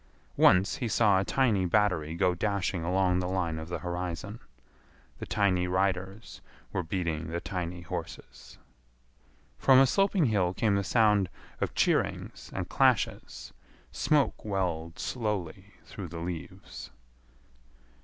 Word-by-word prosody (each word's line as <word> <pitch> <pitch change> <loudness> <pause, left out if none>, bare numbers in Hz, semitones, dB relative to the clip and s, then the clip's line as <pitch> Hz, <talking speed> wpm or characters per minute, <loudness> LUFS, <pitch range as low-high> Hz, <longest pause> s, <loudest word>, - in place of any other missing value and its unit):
Once 95 +2 +4
he 125 - -2
saw 105 -3 +3
a - - +1
tiny 110 -4 +1
battery 90 -5 +1
go 90 +1 +2
dashing 95 -1 -1
along 90 +1 +2
the 90 0 -2
line 85 -4 -1
of 80 +1 -8
the 90 - -2
horizon. 90 +4 -5 0.8
The - - -6
tiny 95 -4 +1
riders 95 +3 -2 0.3
were - - 0
beating 85 -2 -3
the 85 +2 -3
tiny 85 0 -5
horses. 85 - -8 1.0
From 135 -1 +6
a 135 - +7
sloping 195 +2 +2
hill 95 -6 +1
came 110 -3 +1
the 100 0 +1
sound 105 -3 +3 0.3
of - - -2
cheerings - - 0
and - - -4
clashes. - - 0 0.4
Smoke 150 -2 +1
welled 85 -5 -2
slowly 105 -8 -4
through - - -8
the 85 - -8
leaves. 85 -5 -7
95 Hz, 130 wpm, -29 LUFS, 85-105 Hz, 1.0 s, a